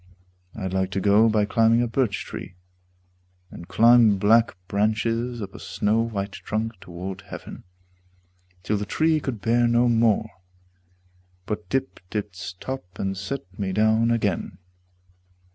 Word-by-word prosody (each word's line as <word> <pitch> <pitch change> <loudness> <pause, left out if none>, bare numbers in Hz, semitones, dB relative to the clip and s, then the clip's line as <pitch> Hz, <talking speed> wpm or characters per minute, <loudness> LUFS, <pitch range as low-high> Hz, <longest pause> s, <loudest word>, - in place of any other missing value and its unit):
I'd 95 -4 -4
like 95 -1 0
to 95 - 0
go 105 +3 +4
by 105 -1 +2
climbing 115 +2 +3
a - - 0
birch 115 -4 -1
tree, - - -8 1.0
And 85 - -10
climb 115 +2 +5
black 110 +1 +3
branches 115 +3 0
up 95 - -8
a - - -10
snow 105 +3 0
white 105 -3 -3
trunk 105 +3 -4
Toward 90 +2 -7
heaven, - - -10 1.0
till 105 +3 0
the 105 - -3
tree 160 +7 +2
could 125 -7 -5
bear 120 +4 +3
no 120 +1 +3
more, 115 -2 +3 1.2
But 105 0 -5
dipped 130 -8 -3
its 100 -3 -4
top 90 -1 -7
and 95 0 -2
set 100 +8 -4 0.2
me 95 -2 -2
down 110 +3 +3
again. 105 -7 -1
110 Hz, 140 wpm, -24 LUFS, 95-115 Hz, 1.2 s, climb